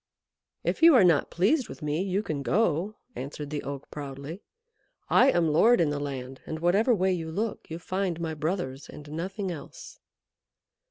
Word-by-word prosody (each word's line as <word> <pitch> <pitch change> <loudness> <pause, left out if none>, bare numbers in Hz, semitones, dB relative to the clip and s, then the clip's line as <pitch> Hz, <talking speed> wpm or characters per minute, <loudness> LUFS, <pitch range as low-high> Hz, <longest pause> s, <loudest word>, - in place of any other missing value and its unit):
"If - - -1
you 330 -2 +8
are 240 - +7
not 170 -5 +4
pleased 240 - +1
with - - -9
me, 150 +3 0
you 195 +1 -1
can 150 -8 -3
go," 180 - +1 0.2
answered 145 +2 -6
the 150 - -2
Oak 140 0 -7
proudly. 140 +5 -7 0.7
"I 265 - +6
am 175 -8 +3
lord 225 +11 +5
in 160 -4 +2
the 145 - -2
land, 135 -2 -5
and 160 - -4
whatever 200 +9 +3
way 190 -1 +2
you 165 -2 -3
look 215 +6 -3
you 165 - -5
find 185 0 -2
my 165 -1 -2
brothers 155 -3 -3
and 150 - -10
nothing 185 +4 -3
else." 160 -4 -10
165 Hz, 175 wpm, -27 LUFS, 145-195 Hz, 0.7 s, you